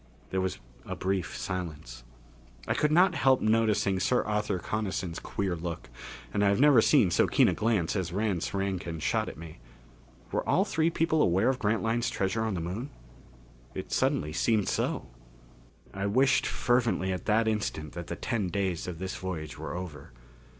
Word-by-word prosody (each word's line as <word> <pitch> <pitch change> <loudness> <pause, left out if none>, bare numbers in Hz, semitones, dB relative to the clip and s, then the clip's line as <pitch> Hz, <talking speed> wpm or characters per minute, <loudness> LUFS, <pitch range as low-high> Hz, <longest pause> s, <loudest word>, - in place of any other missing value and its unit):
There 95 - 0
was 95 0 -2 0.3
a - - -5
brief 95 -2 -2
silence. 75 -10 -5 0.6
I - - +2
could 150 - +1
not 180 +3 +5
help 135 -4 +4
noticing 110 -3 +2
Sir 125 +7 +2
Arthur 105 -2 -1
Coniston's 95 -3 -3
queer 95 -3 -2
look, 85 0 -6 0.4
and 105 - +1
I 100 - +5
have 100 - +2
never 140 -4 +7
seen 115 - +4
so - - +3
keen - - +4
a - - +2
glance 105 -7 0
as 95 -4 -2
Rance 100 -2 -1
Rankin 95 -4 -2
shot - - 0
at - - -10
me. 80 -4 -10 0.7
Were - - 0
all - - +3
three 160 +3 +1
people 165 -1 +1
aware 95 +4 +3
of 130 -1 0
Grantline's 115 +1 0
treasure 95 +3 -1
on 110 -3 -1
the - - -2
Moon? 100 +11 -4 0.9
It - - -6
suddenly 75 +1 +1
seemed 110 0 +1
so. - - -1 0.9
I 100 +1 -2
wished 130 +6 +3
fervently 120 -6 +1
at 90 - -5
that 110 +1 +3
instant 105 -8 -2
that 85 0 -6
the - - -4
ten 110 -6 -2
days 95 -3 -2
of 90 -2 -5
this 95 +2 -4
voyage 80 -5 -5
were - - -5
over. 85 -8 -7
100 Hz, 175 wpm, -29 LUFS, 90-115 Hz, 0.9 s, never